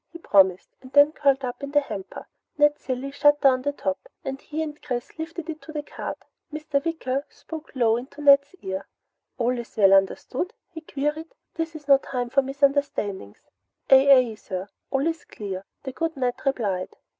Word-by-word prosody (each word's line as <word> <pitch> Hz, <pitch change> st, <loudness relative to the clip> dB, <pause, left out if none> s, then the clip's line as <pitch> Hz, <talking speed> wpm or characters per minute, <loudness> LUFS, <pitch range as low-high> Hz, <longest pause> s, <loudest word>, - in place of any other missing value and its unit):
he 340 Hz, -, -9 dB
promised, 190 Hz, -, +3 dB
and 255 Hz, -, -13 dB
then 285 Hz, +1 st, +7 dB
curled 275 Hz, -3 st, +2 dB
up 245 Hz, +1 st, -5 dB
in 280 Hz, -, -5 dB
the 290 Hz, +1 st, +4 dB
hamper. 200 Hz, -9 st, -7 dB, 0.3 s
Ned 295 Hz, 0 st, +4 dB
Cilley 260 Hz, +1 st, -4 dB
shut 290 Hz, +1 st, +4 dB
down 260 Hz, -2 st, +4 dB
the 285 Hz, +2 st, 0 dB
top 190 Hz, -8 st, -4 dB, 0.2 s
and 270 Hz, 0 st, -4 dB
he 310 Hz, +1 st, -3 dB
and 300 Hz, -1 st, -7 dB
Chris 245 Hz, -3 st, -4 dB
lifted 325 Hz, 0 st, -5 dB
it 315 Hz, -1 st, -6 dB
to 315 Hz, -, -10 dB
the 300 Hz, -1 st, -4 dB
cart. -, -, -6 dB, 0.3 s
Mr. 300 Hz, -2 st, -2 dB
Wicker 280 Hz, -5 st, -2 dB
spoke 320 Hz, -1 st, -10 dB
low 230 Hz, -3 st, +3 dB
into 260 Hz, +4 st, -9 dB
Ned's 280 Hz, +2 st, +5 dB
ear. 190 Hz, 0 st, -4 dB, 0.5 s
"All 245 Hz, +1 st, +1 dB
is 235 Hz, 0 st, -10 dB
well 195 Hz, -2 st, +6 dB
understood?" 220 Hz, -, +1 dB, 0.2 s
he 325 Hz, -2 st, -8 dB
queried. 300 Hz, +2 st, -3 dB, 0.2 s
"This 325 Hz, 0 st, -4 dB
is 295 Hz, -2 st, -10 dB
no 275 Hz, -1 st, +7 dB
time 245 Hz, -3 st, -4 dB
for 275 Hz, -, +4 dB
misunderstandings!" 275 Hz, -, -1 dB, 0.4 s
"Aye 270 Hz, +1 st, +8 dB
aye, 255 Hz, -4 st, +6 dB
sir! 195 Hz, -2 st, -6 dB, 0.2 s
All 270 Hz, +1 st, 0 dB
is 330 Hz, 0 st, -1 dB
clear!" 195 Hz, -2 st, -7 dB, 0.2 s
the 265 Hz, -, -5 dB
good 325 Hz, +3 st, -3 dB
Ned 250 Hz, -2 st, +1 dB
replied. 200 Hz, -9 st, -1 dB
275 Hz, 185 wpm, -25 LUFS, 240-295 Hz, 0.5 s, Aye